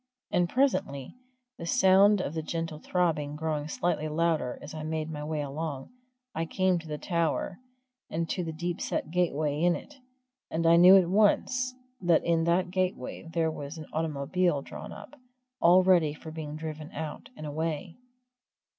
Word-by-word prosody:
And 175 -1 +2
presently 140 - 0 0.5
the 165 - -5
sound 190 +3 +5
of 150 - -3
the 160 - -2
gentle 165 -1 -4
throbbing 155 -5 0
growing 150 -1 -2
slightly 155 -1 -1
louder 155 -5 0
as 145 - -9
I 155 - -5
made 155 0 -3
my 150 -1 -5
way 155 0 -2
along 145 - -5 0.4
I 165 - -1
came 185 0 +1
to 165 - -11
the 150 -1 -4
tower, 170 +2 -1 0.5
and 165 +1 -2
to 180 - -1
the 165 - -4
deep 170 +2 -4
set 155 - -2
gateway 155 -4 0
in 175 0 +4
it, 295 - -9 0.6
and 165 +1 -1
I 165 +1 +7
knew 180 +3 +9
at 185 -3 +3
once 250 +6 +2 0.3
that 175 -3 +3
in 165 -1 +2
that 175 +1 +2
gateway 180 -5 -2
there 165 -1 +1
was 145 +1 -7
an 155 - -7
automobile 155 0 0
drawn - - -8
up, 205 +8 -11 0.4
all 180 +2 +6
ready 170 -5 +4
for 160 +1 -9
being 155 -2 -6
driven 155 -1 -6
out 155 0 -6
and 155 - -7
away. 160 +2 -3
165 Hz, 170 wpm, -29 LUFS, 155-175 Hz, 0.6 s, knew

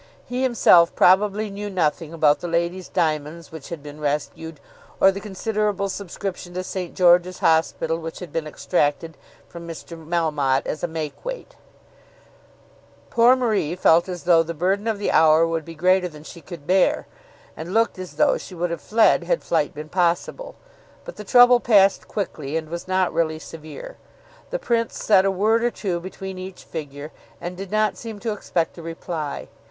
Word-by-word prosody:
He 250 +1 -3
himself 215 -9 +5
probably 205 +3 +3
knew 205 +1 -5
nothing 165 -4 -1
about 155 -3 +3
the 175 - -5
lady's 170 +2 -1
diamonds 155 -2 -2
which 160 -3 -10
had 165 -4 -7
been 150 0 -10
rescued, 150 +2 -3 0.4
or 195 - +6
the 195 - -6
considerable 210 0 -2
subscription 185 -2 -6
to 185 - -2
St. 180 -2 -5
George's 180 0 +4
Hospital 165 0 +1
which 165 0 -7
had 175 -5 -9
been 160 -2 -2
extracted 155 0 -1 0.3
from 170 -1 -10
Mr. 165 +1 -8
Melmotte 155 -5 0
as 155 - -4
a - - +1
make 160 -3 -6
weight. - - -7 1.6
Poor 240 +2 +6
Marie 215 - 0
felt 170 0 +4
as 180 -2 -6
though 170 -2 +5
the 165 +1 -5
burden 195 +6 0
of 220 -2 0
the 205 - -1
hour 160 +1 +5
would 165 -1 -2
be 165 +2 -10
greater 180 +3 +3
than 150 -3 -12
she 170 +2 -11
could 165 -4 -10
bear, 185 +2 +2 0.5
and 165 +3 -7
looked 225 -2 +1
as 185 -1 -8
though 300 - +3
she 185 - -10
would 175 0 -2
have 170 - -4
fled 220 +1 +3
had - - 0
flight - - 0
been 155 -1 -8
possible. 180 - -1 0.5
But - - -9
the 210 - -7
trouble 245 +3 +6
passed 200 -5 +3
quickly, 160 -7 -4
and 160 -1 -5
was 170 +2 -6
not 185 -2 +1
really 160 -1 0
severe. 155 - -10 0.5
The - - -2
Prince 235 - -1
said 195 -3 +4
a - - +3
word 215 +4 +2
or 240 - +3
two 185 -7 -3
between 190 +1 -7
each 185 0 -9
figure, 145 -1 -7 0.3
and 175 +1 -6
did 195 +1 -7
not 215 +1 +1
seem 225 -3 -8
to 230 - -2
expect 170 -4 -2
a - - -7
reply. 165 -2 -5
175 Hz, 180 wpm, -22 LUFS, 160-200 Hz, 1.6 s, or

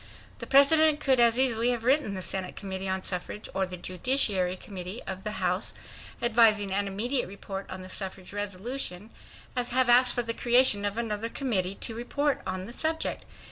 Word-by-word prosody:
The - - -7
President 300 +2 +5
could 265 -3 +2
as 235 0 +5
easily 245 -2 +3
have 240 -2 -2
written 255 -5 +1
the 185 - -4
Senate 185 0 -3
Committee 190 -1 -4
on 190 0 -2
Suffrage 185 +3 -5
or 190 -1 -1
the 180 0 -8
Judiciary 185 -1 +1
Committee 185 +3 -6
of 190 0 -6
the 210 - -4
House, - - -1 0.5
advising 220 -4 +4
an 200 +1 0
immediate 240 +7 0
report 195 0 -8
on 185 0 -7
the - - -10
suffrage 190 0 -6
resolution, 205 0 -4 0.4
as 245 -1 -1
have 255 0 +2
asked 245 +1 +7
for 245 - 0
the 230 0 -1
creation 240 -4 +4
of 205 +2 -3
another 225 -1 -2
committee 200 -8 -2
to 225 - -3
report 275 +5 -2
on 185 0 -4
the 235 - -8
subject. 320 +4 -2
215 Hz, 180 wpm, -27 LUFS, 190-245 Hz, 0.5 s, asked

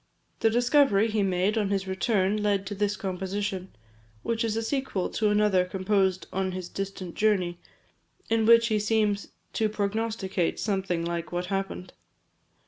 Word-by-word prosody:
The 225 - +4
discovery 240 -2 +3
he 215 -1 +1
made, 195 +3 +1
on 205 -2 0
his 195 -1 -1
return, 195 +1 +1
led 200 -2 +1
to 200 - -4
this 205 +1 -1
composition; 190 0 -3 0.5
which 230 0 -1
is 225 -1 -1
a 225 - -1
sequel 265 -6 -1
to 215 -1 +1
another 210 -3 +3
composed 190 0 0
on 190 0 -1
his 185 -1 -5
distant 195 -3 -5
journey, 185 -5 +1 0.7
in 225 -1 +2
which 230 0 +6
he 215 -1 +2
seems 210 -1 +1 0.3
to 220 -1 +1
prognosticate 205 -3 -1
something 190 -5 -1
like 170 -1 -3
what 175 +1 -2
happened. 195 -1 -4
200 Hz, 150 wpm, -27 LUFS, 190-215 Hz, 0.7 s, which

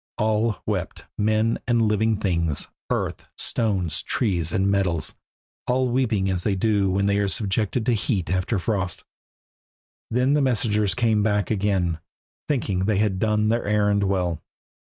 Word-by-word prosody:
All 110 +1 0
wept, - - -3
men 110 +2 +1
and 120 -1 +3
living 110 0 +2
things, 85 -7 -1 0.2
earth, - - -2
stones, 95 -8 -1
trees, 90 -8 -1
and 95 +3 +1
metals, 90 -6 0 0.5
all 130 0 +1
weeping 115 -6 +1
as 95 -2 0
they 100 - +1
do 100 0 +2
when 100 +1 +1
they 100 0 +2
are 100 - +1
subjected 105 +3 -1
to 120 - +3
heat 100 -5 -1
after 95 +4 0
frost. 95 -1 -2 1.1
Then 125 +4 +2
the 150 - +3
messengers 105 -6 +1
came 115 -3 +2
back 105 -2 +1
again, 95 -5 0 0.5
thinking 115 -10 0
they 105 -1 +1
had 100 -2 +1
done 105 0 +2
their 115 +1 +1
errand 105 -1 +2
well. 90 -4 -1
105 Hz, 150 wpm, -24 LUFS, 95-110 Hz, 1.1 s, and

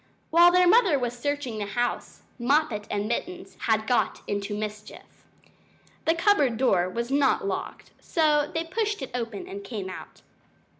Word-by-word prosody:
While 345 +2 +7
their 360 0 +4
mother 385 - +5
was 245 -2 -2
searching 260 -3 -3
the 205 - -3
house, 240 +4 -3 0.2
Moppet 240 -4 +1
and 205 0 -2
Mittens 360 +10 -4
had 220 -1 +2
got 245 +1 0
into 205 0 -3
mischief. 210 0 -8 0.8
The 325 - +3
cupboard 335 - +3
door 185 -8 +2
was 235 +6 -4
not 275 -6 +2
locked, 195 - -5
so 300 -3 +1
they 325 - -2
pushed 415 0 -2
it - - -7
open 230 -4 -4
and 200 +1 -7
came 200 -3 -5
out. - - -11
245 Hz, 155 wpm, -26 LUFS, 210-320 Hz, 0.8 s, While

